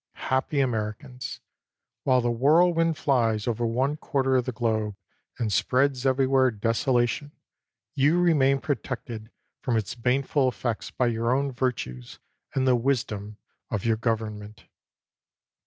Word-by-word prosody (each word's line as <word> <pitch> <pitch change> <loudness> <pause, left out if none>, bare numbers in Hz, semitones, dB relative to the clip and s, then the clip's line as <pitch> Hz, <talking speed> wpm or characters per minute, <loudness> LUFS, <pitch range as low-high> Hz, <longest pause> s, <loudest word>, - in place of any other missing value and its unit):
Happy 130 +2 +1
Americans! 125 +1 -3 0.6
While 130 -2 +4
the 120 0 0
whirlwind 165 +6 +3
flies 115 -6 +1
over 120 0 0
one 130 +6 0
quarter 135 -3 0
of 125 -2 +2
the 130 - -2
globe, 110 -3 -1 0.4
and 110 -4 -1
spreads 130 +2 +2
everywhere 130 0 +3
desolation, 120 +5 0 0.6
you 145 +6 +3
remain 140 -6 +3
protected 120 -5 -4 0.3
from 120 -4 0
its 105 -3 -2
bane 125 +3 +1
ful 135 0 +1
effects 120 -1 -3
by 125 - 0
your 115 0 0
own 140 0 0
virtues, 120 - -3 0.4
and 130 0 +1
the 125 - +5
wisdom 110 -5 -2 0.3
of 110 -2 -3
your 115 -1 +3
government. 110 -2 -3
125 Hz, 130 wpm, -26 LUFS, 115-135 Hz, 0.6 s, the